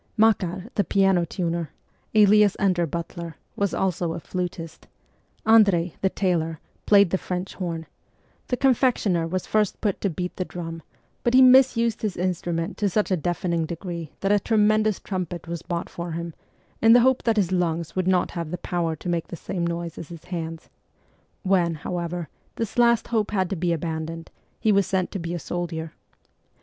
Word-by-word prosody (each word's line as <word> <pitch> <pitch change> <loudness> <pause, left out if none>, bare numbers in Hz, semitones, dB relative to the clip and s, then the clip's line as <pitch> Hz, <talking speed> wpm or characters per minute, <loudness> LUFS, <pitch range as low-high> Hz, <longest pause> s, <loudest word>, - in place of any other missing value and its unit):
Makar, 195 -4 +2
the 205 - +2
piano 190 -1 +2
tuner, 170 -2 -2 0.5
alias 210 -1 +6
under 180 -4 +2
butler, 170 +1 -5 0.2
was 200 -1 0
also 175 -3 -1
a 170 - -5
flutist; 175 -2 -5 0.6
Andrei, 200 -7 +5
the 190 - +3
tailor, 165 -5 -1 0.3
played 200 -4 +6
the 190 - +1
French 180 +1 -4
horn; 165 -3 -4 0.6
the 250 - -1
confectioner 240 -10 +2
was 185 +2 -2
first 215 -2 +1
put 205 -3 -1
to 200 - +1
beat 180 +2 -4
the 185 - 0
drum, 165 -2 -7 0.4
but 240 +1 +2
he 260 - +8
misused 250 -3 +5
his 210 -5 -2
instrument 175 0 -2
to 205 - +2
such 210 +2 0
a - - +4
deafening 170 -1 -1
degree 170 -2 -6
that 195 - +1
a 205 - +5
tremendous 215 -1 +2
trumpet 180 -3 -5
was 170 -1 -4
bought 170 -1 -3
for 170 -1 -6
him, 170 0 -4 0.5
in 225 0 +7
the 245 - +7
hope 260 +1 +3
that 225 -2 +1
his 190 -4 +2
lungs 170 -3 -1
would 185 -1 0
not 185 -1 +2
have 170 -2 -4
the 180 - -3
power 170 -2 -2
to 155 - -9
make 170 -2 -1
the - - -6
same 170 +1 -3
noise 170 -1 -4
as 165 - -8
his 170 -2 -10
hands; 165 -2 -5 0.8
when, 180 -4 +2
however, 170 +1 -4 0.3
this 230 +1 -3
last 235 -1 +4
hope 220 -3 +1
had 190 -3 0
to - - 0
be 175 0 0
abandoned, 165 0 -4 0.3
he 220 - +2
was 200 -2 +3
sent 185 -2 0
to 195 - -4
be 170 0 -4
a - - -2
soldier. 165 -2 -4
180 Hz, 180 wpm, -24 LUFS, 170-200 Hz, 0.8 s, he